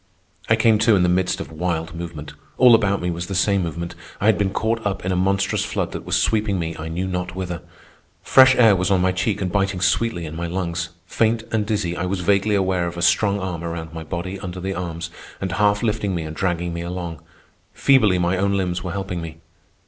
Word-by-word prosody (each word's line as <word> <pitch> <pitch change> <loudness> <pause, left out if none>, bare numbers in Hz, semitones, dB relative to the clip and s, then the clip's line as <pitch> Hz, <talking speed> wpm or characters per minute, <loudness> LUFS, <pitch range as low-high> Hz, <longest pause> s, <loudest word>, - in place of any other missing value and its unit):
I 110 - +6
came 110 -1 +3
to 110 0 +4
in 90 - +3
the 90 - +3
midst 90 +1 +1
of - - -6
wild 80 0 -2
movement. 80 -3 -7 0.2
All 125 -2 +7
about 100 -4 +2
me 90 - 0
was 85 +1 -4
the 95 - -4
same 100 +1 +2
movement. 85 0 -4 0.3
I - - -2
had 110 -1 +5
been 100 -1 0
caught 110 +3 -1
up 100 -2 -2
in 95 - 0
a - - +1
monstrous 95 +2 +1
flood - - -2
that - - -6
was - - +1
sweeping 105 -3 +1
me 85 -2 -3
I 80 - -5
knew 85 +3 -3
not 90 -1 -3
whither. 90 -2 -4 0.6
Fresh 130 0 +7
air 110 -4 +6
was 90 +1 0
on 95 -2 +3
my 95 +1 +2
cheek 95 +3 -1
and 90 - -2
biting 95 -1 0
sweetly 95 -1 +1
in 80 0 -7
my 85 +1 -3
lungs. 85 -1 -3 0.2
Faint 110 +3 +1
and 105 -2 0
dizzy, 100 -5 -1
I 90 +1 -2
was 95 0 -2
vaguely 100 +3 +2
aware 95 -3 +1
of 85 0 -6
a 85 - -2
strong 100 +2 +3
arm 90 -3 -4
around 85 -1 -5
my 80 -1 -6
body 90 +4 -5
under 95 -1 -6
the 95 +1 -3
arms, 85 -1 -5 0.3
and 95 -2 -3
half 105 +2 +2
lifting 105 -4 0
me 85 - -2
and 80 0 -7
dragging 85 -1 -1
me 85 - -4
along. 85 -2 -5 0.5
Feebly 115 -9 +4
my 90 +1 +1
own 100 +1 +1
limbs 90 -2 -2
were 90 - -4
helping 95 -3 -4
me. 80 -1 -7
90 Hz, 230 wpm, -22 LUFS, 85-100 Hz, 0.6 s, All